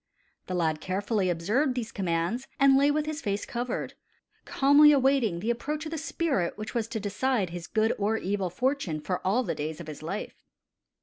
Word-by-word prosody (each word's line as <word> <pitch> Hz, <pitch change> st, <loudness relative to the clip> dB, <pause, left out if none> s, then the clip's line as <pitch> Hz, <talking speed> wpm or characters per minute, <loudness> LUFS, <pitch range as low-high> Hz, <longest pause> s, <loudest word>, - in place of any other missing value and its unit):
The 185 Hz, -, -3 dB
lad 160 Hz, -3 st, 0 dB
carefully 195 Hz, +1 st, -1 dB
observed 220 Hz, -, +1 dB
these 230 Hz, -3 st, -3 dB
commands, 185 Hz, +7 st, -1 dB
and 275 Hz, -1 st, +6 dB
lay 280 Hz, +1 st, +4 dB
with 300 Hz, +1 st, +1 dB
his 310 Hz, 0 st, -4 dB
face 200 Hz, 0 st, -2 dB
covered, 245 Hz, +1 st, -3 dB, 0.5 s
calmly 285 Hz, +2 st, +6 dB
awaiting 265 Hz, -10 st, +2 dB
the 230 Hz, -, +1 dB
approach 300 Hz, +6 st, -3 dB
of 310 Hz, -, -5 dB
the 325 Hz, -, -3 dB
spirit 295 Hz, -, -1 dB
which 215 Hz, 0 st, -6 dB
was 230 Hz, -3 st, -1 dB
to 225 Hz, -1 st, -4 dB
decide 205 Hz, -1 st, 0 dB
his 175 Hz, 0 st, -6 dB
good 220 Hz, +1 st, +1 dB
or 210 Hz, +2 st, +1 dB
evil 195 Hz, -2 st, -1 dB
fortune 245 Hz, -, -1 dB
for 180 Hz, +4 st, -3 dB
all 215 Hz, +7 st, +2 dB
the 190 Hz, -, -2 dB
days 155 Hz, +2 st, -4 dB
of 170 Hz, -, -7 dB
his 155 Hz, -1 st, -8 dB
life. 180 Hz, +7 st, -6 dB
215 Hz, 190 wpm, -28 LUFS, 180-270 Hz, 0.5 s, and